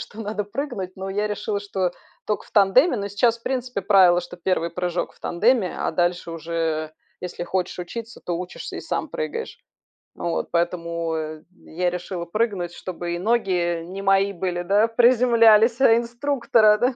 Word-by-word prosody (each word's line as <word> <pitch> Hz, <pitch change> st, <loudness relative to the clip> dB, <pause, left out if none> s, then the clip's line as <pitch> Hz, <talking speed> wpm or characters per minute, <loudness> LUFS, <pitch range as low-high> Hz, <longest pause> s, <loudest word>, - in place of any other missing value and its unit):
что 220 Hz, -, -9 dB
надо 210 Hz, -1 st, -3 dB
прыгнуть, 205 Hz, -5 st, -5 dB
но 190 Hz, +1 st, -5 dB
я 205 Hz, +2 st, 0 dB
решила, 210 Hz, 0 st, -2 dB
что 190 Hz, -3 st, -1 dB, 0.4 s
только 210 Hz, -, -2 dB
в -, -, -21 dB
тандеме. 235 Hz, -, +4 dB
Но 200 Hz, 0 st, -3 dB
сейчас, 230 Hz, +3 st, +2 dB
в -, -, -32 dB
принципе, 250 Hz, -5 st, -2 dB
правило, 185 Hz, -3 st, +5 dB
что 175 Hz, 0 st, -10 dB
1 170 Hz, -1 st, -1 dB
прыжок 180 Hz, 0 st, -2 dB
в -, -, -27 dB
тандеме, 210 Hz, +1 st, +1 dB
а -, -, -1 dB
дальше 175 Hz, 0 st, 0 dB
уже, 165 Hz, -1 st, -2 dB, 0.3 s
если 180 Hz, -1 st, -5 dB
хочешь 185 Hz, -1 st, -2 dB
учиться, 225 Hz, +6 st, -7 dB
то 175 Hz, -1 st, -2 dB
учишься 180 Hz, 0 st, -7 dB
и -, -, -5 dB
сам -, -, -3 dB
прыгаешь. 465 Hz, -1 st, -5 dB, 0.6 s
Вот, 170 Hz, -1 st, -2 dB
поэтому, 170 Hz, -1 st, -1 dB
э, 155 Hz, 0 st, -5 dB, 0.2 s
я 180 Hz, +2 st, -1 dB
решила 180 Hz, 0 st, -5 dB
прыгнуть, 185 Hz, -3 st, -1 dB
чтобы 175 Hz, -1 st, -5 dB
и -, -, -4 dB
ноги 180 Hz, -6 st, 0 dB
не 190 Hz, +3 st, -7 dB
мои 195 Hz, 0 st, +3 dB
были, 175 Hz, 0 st, -2 dB
да, 205 Hz, +5 st, +3 dB
приземлялись, 235 Hz, 0 st, +5 dB
а 225 Hz, -4 st, +7 dB
инструктора, 235 Hz, -3 st, +2 dB
да. 250 Hz, +2 st, +1 dB
195 Hz, 170 wpm, -23 LUFS, 175-225 Hz, 0.6 s, а